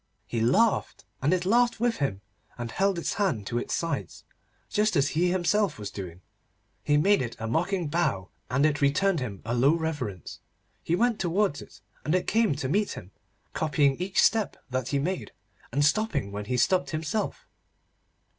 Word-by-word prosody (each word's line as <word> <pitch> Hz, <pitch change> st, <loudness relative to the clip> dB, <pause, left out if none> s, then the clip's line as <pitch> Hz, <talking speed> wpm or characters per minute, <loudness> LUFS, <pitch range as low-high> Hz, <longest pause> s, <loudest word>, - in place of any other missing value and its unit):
He 115 Hz, -, -2 dB
laughed, 195 Hz, -, +2 dB, 0.2 s
and 140 Hz, +4 st, +2 dB
it 180 Hz, -1 st, +1 dB
laughed 240 Hz, +4 st, +3 dB
with 240 Hz, 0 st, +1 dB
him, 105 Hz, -9 st, -2 dB, 0.4 s
and 120 Hz, -1 st, -5 dB
held 195 Hz, -1 st, +1 dB
its 170 Hz, -, -2 dB
hands 155 Hz, -, 0 dB
to 120 Hz, +3 st, -1 dB
its -, -, -2 dB
sides, 150 Hz, -, -3 dB, 0.4 s
just 210 Hz, +1 st, +1 dB
as 140 Hz, -, +3 dB
he 175 Hz, +3 st, +1 dB
himself 185 Hz, +1 st, +1 dB
was 105 Hz, -1 st, -6 dB
doing. 90 Hz, -3 st, -8 dB, 0.6 s
He 145 Hz, 0 st, +2 dB
made 200 Hz, +5 st, +4 dB
it 115 Hz, -2 st, -4 dB
a 115 Hz, -, -4 dB
mocking 175 Hz, -, 0 dB
bow, 145 Hz, -, -1 dB, 0.2 s
and 135 Hz, +4 st, +2 dB
it 150 Hz, -1 st, +1 dB
returned 165 Hz, +6 st, +2 dB
him 110 Hz, -7 st, -6 dB
a 115 Hz, -, -2 dB
low 135 Hz, +6 st, +4 dB
reverence. 145 Hz, -, -4 dB, 0.4 s
He 170 Hz, -, 0 dB
went 235 Hz, +3 st, +1 dB
towards 180 Hz, -3 st, 0 dB
it, -, -, -14 dB, 0.2 s
and 155 Hz, -, +1 dB
it 185 Hz, -, +1 dB
came 220 Hz, -7 st, +2 dB
to 135 Hz, -, -3 dB
meet 200 Hz, +8 st, +1 dB
him, 95 Hz, 0 st, -10 dB, 0.4 s
copying 145 Hz, -3 st, +2 dB
each 185 Hz, +2 st, -1 dB
step 220 Hz, -3 st, +2 dB
that 130 Hz, -1 st, -1 dB
he 140 Hz, -, 0 dB
made, 175 Hz, +6 st, -3 dB, 0.4 s
and 145 Hz, +4 st, +2 dB
stopping 150 Hz, -, +1 dB
when 105 Hz, +1 st, -5 dB
he 125 Hz, +4 st, -1 dB
stopped 185 Hz, +8 st, +2 dB
himself. 160 Hz, +7 st, -3 dB
155 Hz, 180 wpm, -27 LUFS, 125-190 Hz, 0.6 s, made